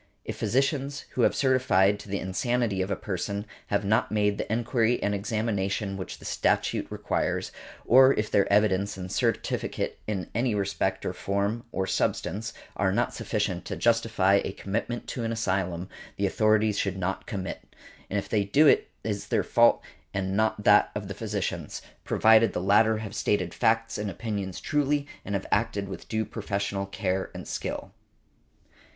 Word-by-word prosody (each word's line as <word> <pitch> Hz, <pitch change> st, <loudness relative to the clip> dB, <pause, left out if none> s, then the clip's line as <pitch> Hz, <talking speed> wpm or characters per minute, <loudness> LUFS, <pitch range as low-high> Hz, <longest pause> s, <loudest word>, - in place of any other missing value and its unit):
If -, -, -4 dB
physicians, 140 Hz, +2 st, 0 dB
who 125 Hz, -, -1 dB
have -, -, +4 dB
certified 125 Hz, -7 st, +3 dB
to 105 Hz, -, -11 dB
the 100 Hz, -, -1 dB
insanity 105 Hz, +1 st, 0 dB
of 95 Hz, -, -2 dB
a 100 Hz, -, 0 dB
person, 100 Hz, +2 st, -3 dB, 0.2 s
have 100 Hz, 0 st, 0 dB
not 110 Hz, +4 st, +2 dB
made 105 Hz, -1 st, +1 dB
the -, -, -3 dB
enquiry 120 Hz, +1 st, +1 dB
and 105 Hz, -, +1 dB
examination 100 Hz, -1 st, -1 dB
which 95 Hz, -1 st, -6 dB
the -, -, -14 dB
statute -, -, 0 dB
requires, -, -, -2 dB, 0.3 s
or 130 Hz, +2 st, +7 dB
if 105 Hz, 0 st, -2 dB
their 100 Hz, -, +3 dB
evidence 100 Hz, -1 st, +2 dB
and 90 Hz, -1 st, -6 dB
certificate -, -, -1 dB
in 95 Hz, -5 st, -2 dB
any 115 Hz, 0 st, +1 dB
respect 100 Hz, -1 st, -1 dB
of 90 Hz, -, -2 dB
form 100 Hz, +4 st, -1 dB
or 95 Hz, -, -1 dB
substance 105 Hz, +3 st, -1 dB, 0.2 s
are -, -, +1 dB
not -, -, 0 dB
sufficient -, -, -2 dB
to -, -, -4 dB
justify 110 Hz, -4 st, +3 dB
a -, -, -4 dB
commitment 115 Hz, +5 st, -3 dB
to 120 Hz, -, -3 dB
an 115 Hz, -, -1 dB
asylum, 95 Hz, -5 st, -1 dB, 0.3 s
the 100 Hz, -, +1 dB
authorities 110 Hz, +1 st, +2 dB
should 95 Hz, -1 st, -1 dB
not 95 Hz, +1 st, -3 dB
commit, 95 Hz, -5 st, -4 dB, 0.5 s
and 100 Hz, -, -1 dB
if 100 Hz, -, -2 dB
they 105 Hz, -2 st, +1 dB
do 135 Hz, +11 st, +4 dB
it -, -, +5 dB
is 105 Hz, -2 st, -3 dB
their -, -, +1 dB
fault -, -, +4 dB, 0.3 s
and 95 Hz, 0 st, -1 dB
not 110 Hz, 0 st, +1 dB
that 105 Hz, 0 st, +6 dB
of 100 Hz, -2 st, -4 dB
the -, -, -3 dB
physicians, 105 Hz, -2 st, -3 dB, 0.2 s
provided 110 Hz, +1 st, +5 dB
the -, -, -1 dB
latter 105 Hz, +4 st, +4 dB
have 105 Hz, -1 st, -6 dB
stated 90 Hz, -4 st, 0 dB
facts 115 Hz, -1 st, +1 dB
and 105 Hz, -1 st, -2 dB
opinions 100 Hz, -2 st, -4 dB
truly 145 Hz, -1 st, 0 dB, 0.2 s
and 100 Hz, -, -3 dB
have 100 Hz, -, -2 dB
acted 110 Hz, -4 st, 0 dB
with 95 Hz, -, -8 dB
due 110 Hz, 0 st, 0 dB
professional 100 Hz, -2 st, -3 dB
care 95 Hz, -1 st, -2 dB
and -, -, -7 dB
skill. -, -, -4 dB
105 Hz, 170 wpm, -27 LUFS, 95-115 Hz, 0.5 s, or